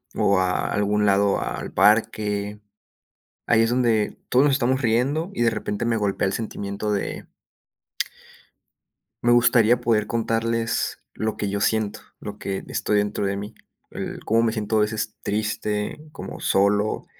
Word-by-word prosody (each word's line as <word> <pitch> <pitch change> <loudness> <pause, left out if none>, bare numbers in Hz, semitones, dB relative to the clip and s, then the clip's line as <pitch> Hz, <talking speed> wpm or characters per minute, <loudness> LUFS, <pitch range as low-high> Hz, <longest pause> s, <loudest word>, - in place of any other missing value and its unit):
o 100 -1 +3
a 90 0 0
algún 105 +1 +1
lado 100 0 +3
al - - -4
parque, 105 -1 +2 0.9
ahí 115 -1 +4
es 115 - +3
donde 120 -4 +1
todos 130 +3 +4
nos 140 - +3
estamos 130 0 +1
riendo 130 - +1
y 120 - +1
de 115 - +3
repente 105 +2 -3
me 115 -1 +1
golpea 100 -2 0
el 95 - -2
sentimiento 105 -1 -3
de 100 - -3 2.0
me 120 0 +5
gustaría 120 0 +4
poder 110 -3 +1
contarles 115 +1 -1
lo 110 0 -2
que 100 - -2
yo 100 0 -2
siento, 110 0 0 0.2
lo - - -7
que 95 -1 -4
estoy 105 -1 +1
dentro 105 0 -1
de 100 0 0
mí, 100 +1 -6 0.4
el - - -6
como 115 +1 +2
me 115 -1 +1
siento 110 0 -1
a - - +4
veces 110 0 -1
triste, 105 +1 -2 0.2
como - - -8
solo, 105 +2 +1
110 Hz, 155 wpm, -23 LUFS, 105-115 Hz, 2.0 s, me